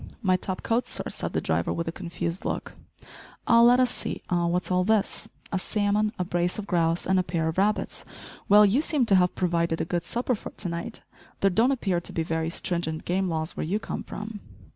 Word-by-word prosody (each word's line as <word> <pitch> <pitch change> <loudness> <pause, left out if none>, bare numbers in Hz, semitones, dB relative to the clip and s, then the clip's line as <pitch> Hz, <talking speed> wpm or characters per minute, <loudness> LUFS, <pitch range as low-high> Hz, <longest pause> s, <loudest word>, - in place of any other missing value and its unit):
"My 185 -2 +4
top 185 0 -3
coat 235 +2 +1
sir," - - -3
said - - -4
the - - 0
driver, - - 0
with 165 0 -2
a - - -1
confused 170 0 -4
look. - - -3 0.7
"Ah, 230 0 +6
let 245 +1 +7
us 255 -2 +3
see - - -4
eh! 175 -1 +2
what's 180 +2 -1
all 180 0 +3
this? 215 +1 +1 0.2
A 190 - 0
salmon! 210 +1 +1
a 180 - 0
brace 175 0 -1
of 210 - -4
grouse! 170 -3 +1
and 190 0 +3
a - - +2
pair 165 -2 -1
of 160 +3 -1
rabbits! 210 +2 0 0.5
Well, 210 +1 +8
you 215 +8 +3
seem 300 -5 +1
to 200 - +4
have 180 -1 +2
provided 170 -2 0
a - - 0
good 175 0 -1
supper 240 +8 -1
for 215 - -5
to 185 - -6
night. 170 +7 -5 0.4
There 195 - +4
don't 230 +8 +3
appear 195 -10 0
to - - -3
be 165 - 0
very 160 0 -1
stringent 170 -2 -3
game 185 +1 0
laws 160 -1 -2
where - - -3
you 180 +7 0
come 215 - -5
from!" 210 0 -7
185 Hz, 225 wpm, -26 LUFS, 170-210 Hz, 0.7 s, Well